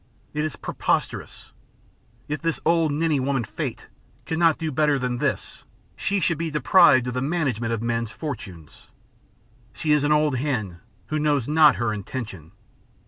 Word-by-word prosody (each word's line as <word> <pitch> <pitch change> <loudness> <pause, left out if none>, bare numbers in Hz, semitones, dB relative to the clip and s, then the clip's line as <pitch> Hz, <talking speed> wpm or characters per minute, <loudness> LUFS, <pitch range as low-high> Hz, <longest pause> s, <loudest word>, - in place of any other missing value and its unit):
It 150 0 -1
is 155 -6 -3
preposterous. - - -3 0.8
If 150 -1 -3
this 165 -1 -1
old 165 -2 +3
ninny 155 0 +1
woman, 135 -1 0
Fate, - - -5 0.4
cannot 165 -1 +2
do 160 -2 -3
better 150 0 +2
than 125 -2 -2
this, - - -2 0.3
she 200 0 0
should 165 -3 0
be 165 -1 -1
deprived 150 -1 +5
of 125 - -3
the 125 - -2
management 135 -7 -1
of 115 -1 -2
men's 115 -1 -1
fortunes. 105 - -8 0.9
She 155 - -1
is 150 -1 +4
an 145 - +1
old 150 -3 +3
hen 110 -11 -2 0.3
who 155 - -1
knows 145 -5 +1
not 150 0 +6
her 120 -2 -1
intention. 100 - -6
145 Hz, 155 wpm, -24 LUFS, 120-155 Hz, 0.9 s, not